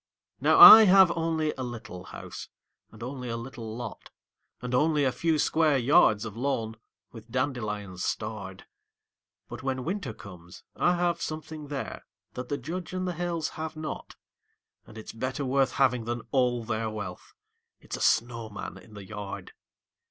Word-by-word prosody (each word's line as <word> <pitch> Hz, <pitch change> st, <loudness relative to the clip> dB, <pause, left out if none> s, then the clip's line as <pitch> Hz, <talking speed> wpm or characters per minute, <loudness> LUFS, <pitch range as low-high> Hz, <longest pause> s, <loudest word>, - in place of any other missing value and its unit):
Now -, -, +3 dB
I 220 Hz, 0 st, +13 dB
have 190 Hz, -2 st, +6 dB
only 160 Hz, -2 st, -1 dB
a -, -, -2 dB
little 115 Hz, -7 st, -7 dB
house, -, -, -9 dB, 0.4 s
and 110 Hz, -, -11 dB
only 125 Hz, 0 st, -6 dB
a 115 Hz, -, -3 dB
little 115 Hz, -2 st, -7 dB
lot, 120 Hz, -3 st, -8 dB, 0.5 s
And 125 Hz, 0 st, -6 dB
only 150 Hz, +3 st, +2 dB
a 130 Hz, -, +2 dB
few 160 Hz, +3 st, 0 dB
square 155 Hz, -1 st, +2 dB
yards 120 Hz, -5 st, +4 dB
of 110 Hz, -2 st, -7 dB
lawn, 115 Hz, -3 st, -2 dB, 0.3 s
with 115 Hz, -1 st, -13 dB
dandelions 105 Hz, -8 st, -3 dB
starred; 100 Hz, -3 st, -4 dB, 0.8 s
But -, -, -8 dB
when 130 Hz, -1 st, -2 dB
Winter 185 Hz, -, -3 dB
comes, 90 Hz, -5 st, -13 dB
I 175 Hz, -, +2 dB
have 175 Hz, -1 st, 0 dB
something 155 Hz, -1 st, -6 dB
there 140 Hz, -2 st, -6 dB, 0.3 s
that 125 Hz, 0 st, -7 dB
the 145 Hz, -, -1 dB
Judge 175 Hz, +2 st, -6 dB
and 185 Hz, 0 st, -2 dB
the 180 Hz, -, -2 dB
Hales 170 Hz, -2 st, -2 dB
have 160 Hz, 0 st, -6 dB
not, 155 Hz, 0 st, -7 dB, 0.7 s
And 110 Hz, -, -13 dB
it's 110 Hz, -, -9 dB
better 130 Hz, +5 st, -3 dB
worth 135 Hz, 0 st, +1 dB
having 125 Hz, -4 st, +2 dB
than 120 Hz, 0 st, -3 dB
all 125 Hz, -3 st, +1 dB
their 110 Hz, 0 st, -2 dB
wealth 105 Hz, -4 st, -8 dB, 0.4 s
it's -, -, -7 dB
a -, -, -7 dB
snowman 110 Hz, -4 st, -1 dB
in 105 Hz, +3 st, -16 dB
the 100 Hz, -1 st, -9 dB
yard. 105 Hz, -1 st, -7 dB
125 Hz, 160 wpm, -27 LUFS, 110-155 Hz, 0.8 s, I